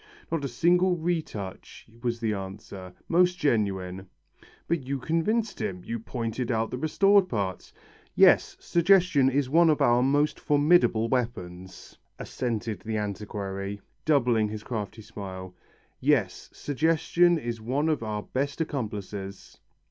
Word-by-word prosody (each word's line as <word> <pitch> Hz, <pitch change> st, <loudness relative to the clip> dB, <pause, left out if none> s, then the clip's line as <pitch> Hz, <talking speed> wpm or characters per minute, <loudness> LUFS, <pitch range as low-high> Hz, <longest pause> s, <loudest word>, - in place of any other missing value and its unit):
"Not 165 Hz, -3 st, -1 dB
a -, -, -1 dB
single 175 Hz, +8 st, +2 dB
retouch," 160 Hz, -, -4 dB, 0.2 s
was 120 Hz, -1 st, -2 dB
the 110 Hz, -2 st, 0 dB
answer, 95 Hz, -1 st, -8 dB, 0.2 s
"most 180 Hz, +1 st, +3 dB
genuine." 95 Hz, -, -1 dB, 0.6 s
"But 160 Hz, -6 st, -1 dB
you 140 Hz, +1 st, -1 dB
convinced 200 Hz, -, -1 dB
him. 90 Hz, -2 st, -4 dB
You 115 Hz, 0 st, -3 dB
pointed 115 Hz, +1 st, -4 dB
out 110 Hz, -1 st, -1 dB
the 125 Hz, -, -4 dB
restored 195 Hz, +5 st, +3 dB
parts." 100 Hz, -5 st, -3 dB, 0.4 s
"Yes, -, -, +5 dB
suggestion 175 Hz, -6 st, +3 dB
is 135 Hz, 0 st, 0 dB
one 165 Hz, +4 st, +4 dB
of 150 Hz, -, +2 dB
our 120 Hz, +1 st, +4 dB
most 145 Hz, +3 st, +1 dB
formidable 145 Hz, -6 st, +3 dB
weapons," 95 Hz, -7 st, -4 dB, 0.2 s
assented 115 Hz, -3 st, -3 dB
the 110 Hz, 0 st, -4 dB
antiquary, 100 Hz, -1 st, -4 dB, 0.2 s
doubling 120 Hz, -8 st, +2 dB
his 105 Hz, 0 st, -6 dB
crafty 110 Hz, -1 st, -5 dB
smile. 95 Hz, -3 st, -8 dB, 0.5 s
"Yes. -, -, 0 dB
Suggestion 165 Hz, +4 st, +2 dB
is 120 Hz, -6 st, -5 dB
one 135 Hz, +7 st, -1 dB
of 155 Hz, -5 st, 0 dB
our 105 Hz, -2 st, -3 dB
best 140 Hz, +3 st, -3 dB
accomplices." 105 Hz, -, -5 dB
120 Hz, 130 wpm, -27 LUFS, 105-155 Hz, 0.6 s, Yes